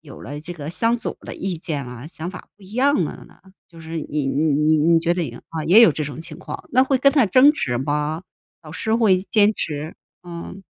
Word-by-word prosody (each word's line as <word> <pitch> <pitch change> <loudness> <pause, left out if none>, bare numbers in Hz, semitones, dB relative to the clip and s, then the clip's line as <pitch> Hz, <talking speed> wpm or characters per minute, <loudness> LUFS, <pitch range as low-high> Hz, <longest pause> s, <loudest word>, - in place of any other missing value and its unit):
有 - - -13
了 145 +2 -7
这 175 +3 -7
个 150 -4 -8
相 230 +7 +1
左 - - -4
的 - - -8
意 185 -2 -3
见 155 -5 -4
啊， 125 +1 -9
想 170 0 -6
法 185 - -11
不 205 - -22
一 190 - -15
样 260 -5 +2
了 - - -7
呢？ - - -21 0.3
就 165 -1 -14
是 165 +1 -7
你 150 -1 -3
你 140 +3 0
你 150 +1 +3
你 165 +2 +4
觉 170 +1 +1
得 175 - -1
赢 120 -5 -6
啊， 160 -1 -4
也 185 +8 +7
有 230 -9 +7
这 155 - -3
种 145 -1 -6
情 165 -2 -6
况， - - -9
那 255 - +5
会 265 -1 +1
跟 275 +1 +4
他 275 -6 +4
争 255 +9 +6
执 120 - -2
吗？ 150 +4 -2 0.4
老 155 -2 -12
师 220 +5 -2
会 210 -6 +4
坚 210 +2 +3
持？ 155 -2 -4 0.3
嗯。 175 +3 -8
165 Hz, 255 characters per minute, -21 LUFS, 150-205 Hz, 0.4 s, 也